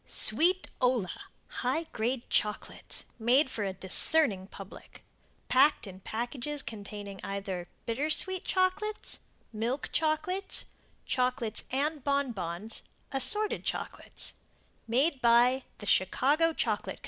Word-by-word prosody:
Sweetola 255 - +2 0.5
High 265 +7 0
Grade 235 +3 -2
Chocolates 210 0 -1
MADE 260 +5 +4
FOR 215 - -2
A 190 - -2
DISCERNING 190 - +2
PUBLIC 195 0 -12 0.4
Packed 270 0 +4
in 190 -2 -9
Packages 245 +7 -3
containing 205 -3 -7
either 195 -3 -4 0.2
BITTER 265 +7 -1
SWEET 375 +3 +4
CHOCOLATES 375 +3 0 0.3
MILK 235 +6 -2
CHOCOLATES 365 +5 +1 0.4
CHOCOLATES 250 -4 0
and 290 +2 -1
BON 280 -2 +1
BONS 185 +2 -3 0.3
ASSORTED 420 +10 +2
CHOCOLATES - - -3 0.5
MADE 265 +4 +2
BY 245 +2 +4
The 205 - -9
Chicago 280 - +3
Chocolate - - -1
Co. - - -22
250 Hz, 110 wpm, -30 LUFS, 210-300 Hz, 0.5 s, MADE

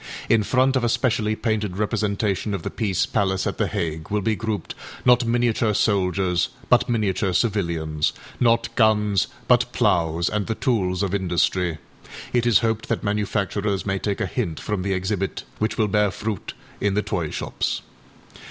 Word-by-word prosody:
â - - -16 0.3
In 115 -1 +5
front 130 +5 +2
of 130 - +1
a 120 - +2
specially 110 -3 +1
painted 110 -4 -1
representation 105 -1 0
of 90 - -6
the - - -3
Peace 100 -5 0
Palace 95 -1 0
at - - -3
The - - +2
Hague 80 -1 -3
will 105 0 0
be 110 +1 +1
grouped, 110 -1 -3 0.3
not 125 -1 +5
miniature 115 -2 +1
soldiers 95 -4 +1 0.2
but - - +4
miniature 100 -4 0
civilians, 85 -8 0 0.3
not 115 -1 +2
guns 105 -3 +3 0.2
but - - +4
ploughs 85 0 +2
and 105 -1 -1
the 110 - -1
tools 95 -7 0
of 95 -1 -1
industry... 90 -2 +1 0.6
It 120 -1 +2
is 115 - +6
hoped 110 0 -1
that - - -1
manufacturers 100 -1 -1
may 95 -1 -1
take 100 0 -2
a - - +1
hint 90 - -3
from 105 -3 -2
the 100 +1 -1
exhibit, 95 +1 -2 0.2
which 110 - -1
will 110 - +2
bear 105 0 +2
fruit 105 +2 -5 0.2
in 100 -1 +1
the 105 - +1
toy 85 -5 -2
shops. - - -3
105 Hz, 170 wpm, -23 LUFS, 95-110 Hz, 0.6 s, is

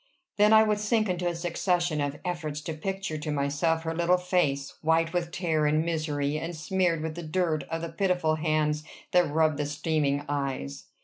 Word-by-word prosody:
Then 210 +1 +5
I 220 0 +8
would 210 -1 +1
sink 215 0 +1
into 180 0 -1
a 175 - -1
succession 175 -2 0
of 145 0 -2
efforts 155 -4 -3
to 160 - -4
picture 190 -1 -4
to 150 0 -3
myself 150 +3 0
her 165 0 -2
little 175 +2 +3
face, 175 -7 0
white 165 +1 +2
with 175 -1 -1
terror 160 -5 +1
and 155 +2 +2
misery, 155 -3 -1
and 165 +2 -5
smeared 170 0 0
with 160 -1 -3
the 175 - -6
dirt 160 -1 -1
of 165 0 -3
the 170 - -3
pitiful 165 -2 +1
hands 155 -1 0 0.3
that 180 -3 +4
rubbed 155 0 +2
the 145 -1 -1
streaming 145 -1 0
eyes. 135 - -3
160 Hz, 190 wpm, -28 LUFS, 150-175 Hz, 0.3 s, I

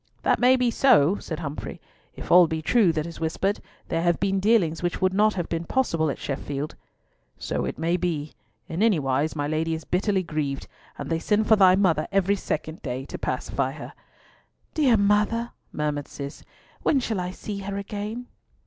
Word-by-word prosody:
"That - - +2
may 250 +1 +6
be 250 -2 +1
so," 205 - +4
said 160 0 -6
Humfrey. 150 -2 -6 0.4
"If - - -7
all 175 -1 +8
be 160 -1 -3
true 205 0 +4
that 155 -1 -2
is 170 - -8
whispered, 180 +5 -1 0.3
there 165 -1 -1
have 175 -1 +2
been 195 0 +1
dealings 190 -6 +2
which 175 -1 -1
would 185 0 +2
not 210 +1 +3
have 175 -3 -2
been 165 0 -2
possible 165 - 0
at - - -3
Sheffield." 140 +1 -4 0.6
"So - - -2
it - - -4
may 170 +2 +1
be. 160 -4 -2 0.3
In 170 +1 -3
any 220 -5 +4
wise 140 +2 0
my 145 -1 -1
Lady 160 +2 0
is 160 - -7
bitterly 190 +1 +1
grieved, 150 -4 -3 0.3
and - - -5
they 165 - +1
send 210 +5 +1
for 220 - +7
thy 190 -3 +6
mother 175 -6 +2
every 195 0 +2
second 155 -4 -4
day 130 +1 -4
to - - -7
pacify - - -2
her." - - -9 0.8
"Dear 265 -7 +4
mother!" 210 +3 +2 0.2
murmured 150 -1 -2
Cis; 140 +1 -8 0.4
"when 280 - +3
shall 225 -5 -2
I 180 0 -2
see 200 +2 -6
her 200 0 -4
again?" 210 +4 -5
180 Hz, 190 wpm, -25 LUFS, 155-205 Hz, 0.8 s, all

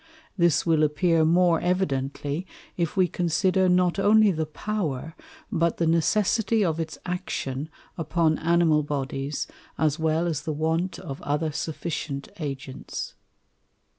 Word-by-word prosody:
This 170 -4 +3
will 160 -2 +3
appear 160 +2 +3
more 170 +1 +4
evidently, 145 -2 -1 0.3
if 170 +1 -2
we 185 -1 +5
consider 185 +2 +1
not 180 +1 +3
only 210 +1 +5
the 160 -3 -2
Power, 160 -4 -3 0.4
but 170 -4 +1
the 170 - +1
Necessity 210 +6 +2
of 165 -2 0
its 160 -1 -4
Action 155 -5 -3 0.3
upon 160 0 +1
Animal 165 -2 +3
Bodies, 140 0 -3 0.3
as 155 0 +1
well 160 +1 +1
as 160 -4 -1
the 155 - -3
want 160 +4 -1
of 135 0 -7
other 150 +2 -1
sufficient 150 -2 -4
Agents. 135 -3 -5
160 Hz, 130 wpm, -26 LUFS, 150-180 Hz, 0.4 s, we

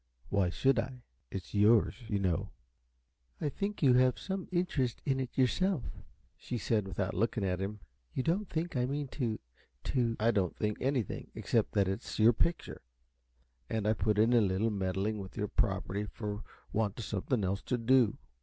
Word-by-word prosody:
Why 100 -3 +2
should 130 +7 +2
I? 125 +1 -4 0.3
It's 95 +3 -6
yours, 105 +2 +5
you 105 - 0
know." 90 -4 0 0.9
"I 150 - 0
think 200 +4 -3
you 130 -3 +7
have 125 0 +4
some 190 -1 -4
interest 165 -9 0
in 135 -2 +1
it 130 -2 -4
yourself," 150 +4 +2 0.5
she 125 - -5
said, 105 -2 0
without 95 0 -2
looking 110 +1 0
at 90 -1 0
him. 100 +1 -4 0.3
"You 130 - -2
don't 185 +6 0
think 165 0 -2
I 125 0 +1
mean 140 0 -2
to 115 -6 -2 0.4
to 120 -4 +1
" - - -29
"I 115 +2 +4
don't 95 -6 0
think 105 -1 -1
anything, 130 -5 -1
except - - 0
that 100 -2 +3
it's 95 +5 -3
your 110 +2 +6
picture, 170 +9 -1 0.9
and 110 -2 -1
I 110 - +4
put 105 0 +1
in 110 +3 +4
a 120 - +6
little 100 +2 +1
time 100 - -3
meddling 95 +3 -1
with 95 +1 -8
your 105 -1 0
property 100 -1 0
for 105 0 -5 0.3
want 105 -1 0
of 115 - -4
something 110 +2 -1
else 95 +1 0
to 125 - -1
do. 120 -2 +4
110 Hz, 185 wpm, -32 LUFS, 100-130 Hz, 0.9 s, you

